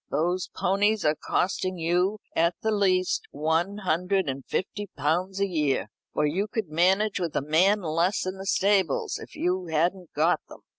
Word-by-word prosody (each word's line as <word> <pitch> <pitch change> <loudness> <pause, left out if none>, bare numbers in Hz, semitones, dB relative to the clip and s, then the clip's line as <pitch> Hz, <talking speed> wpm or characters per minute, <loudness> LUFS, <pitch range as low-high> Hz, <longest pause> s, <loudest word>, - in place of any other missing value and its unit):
Those 175 +5 0
ponies 205 +2 +1
are 150 - +4
costing 185 +3 -1
you 180 +5 +1 0.2
at 170 +1 +2
the 220 - +1
least 185 -3 +2
one 160 +7 0
hundred 180 +1 +1
and 135 0 -3
fifty 205 +2 -3
pounds 175 +7 0
a 200 - +3
year, 150 - 0 0.2
for 150 - +1
you 185 +8 0
could 215 -5 -3
manage 190 +6 +2
with 170 -4 -3
a - - +2
man 185 +8 +3
less 170 +5 0
in 185 +1 -4
the 195 - -7
stables 190 -6 +1
if - - -11
you 180 0 -1
hadn't 170 +2 0
got - - +2
them." - - -12
180 Hz, 170 wpm, -26 LUFS, 160-195 Hz, 0.2 s, are